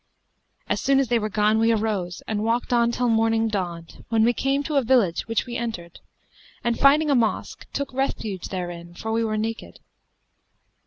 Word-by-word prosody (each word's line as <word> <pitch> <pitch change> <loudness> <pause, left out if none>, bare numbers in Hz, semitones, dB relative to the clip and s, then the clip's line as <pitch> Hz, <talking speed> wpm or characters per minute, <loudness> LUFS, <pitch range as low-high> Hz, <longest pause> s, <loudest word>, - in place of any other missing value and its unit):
As - - -1
soon 275 0 +3
as 270 -4 0
they 240 -1 +3
were 215 0 -2
gone, 215 +1 +2
we 225 +1 +3
arose 205 -5 -1
and 210 -1 -1
walked 235 +2 0
on 235 0 +3
till 245 +1 0
morning 225 0 +2
dawned, 175 -5 -5
when 225 -1 +3
we 240 +2 +4
came 275 +3 0
to 300 -1 -1
a - - +5
village 230 -8 +2
which 225 -1 0
we 240 -1 -6
entered, 180 -8 -5 0.6
and 235 -1 0
finding 295 +2 +5
a - - +4
mosque 230 -3 -1
took 280 -2 -4
refuge 220 -8 -2
therein 175 -2 -6
for 220 +5 -5
we 225 +1 +1
were 215 -1 -1
naked. 225 +1 -4
225 Hz, 190 wpm, -24 LUFS, 210-245 Hz, 0.6 s, a